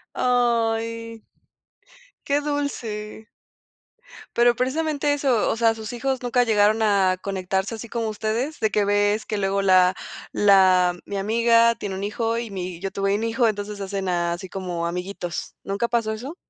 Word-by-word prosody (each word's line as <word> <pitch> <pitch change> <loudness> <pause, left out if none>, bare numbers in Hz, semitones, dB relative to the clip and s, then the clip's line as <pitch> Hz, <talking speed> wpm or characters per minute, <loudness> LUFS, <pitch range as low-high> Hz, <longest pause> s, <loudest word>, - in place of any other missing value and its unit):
Ay. 230 -2 0 1.0
Qué 285 +1 +2
dulce. 230 -8 -4 1.1
Pero, 240 0 +4
precisamente 290 +3 0
eso, 270 -6 +1
o - - -1
sea, 225 -1 +2
sus 220 +1 -7
hijos 260 +1 -2
nunca 245 0 +2
llegaron 215 -1 +3
a 195 -3 +3
conectarse 190 +2 -2
así 225 +1 -8
como 230 0 -3
ustedes, 225 +7 -3
de 220 - +1
que 210 0 +2
ves 205 +1 +1
que 215 - -2
luego 195 0 0
la 185 -1 +5 0.4
la 185 -3 +4
mi 200 - -4
amiga 230 +3 +3
tiene 205 -3 -5
un 190 +1 -5
hijo 225 +2 -1
y 235 -1 -5
mi 180 -3 -5
yo 195 +1 -3
tuve 195 0 -1
un 215 - -2
hijo, 230 +1 +2
entonces 205 -1 -3
hacen 195 -1 -3
a 175 -1 0
así 180 +2 -7
como 175 -3 -3
amiguitos, 180 0 -5
¿nunca 200 +4 -1
pasó 230 -2 0
eso? 255 +9 -7
215 Hz, 160 wpm, -23 LUFS, 195-235 Hz, 1.1 s, la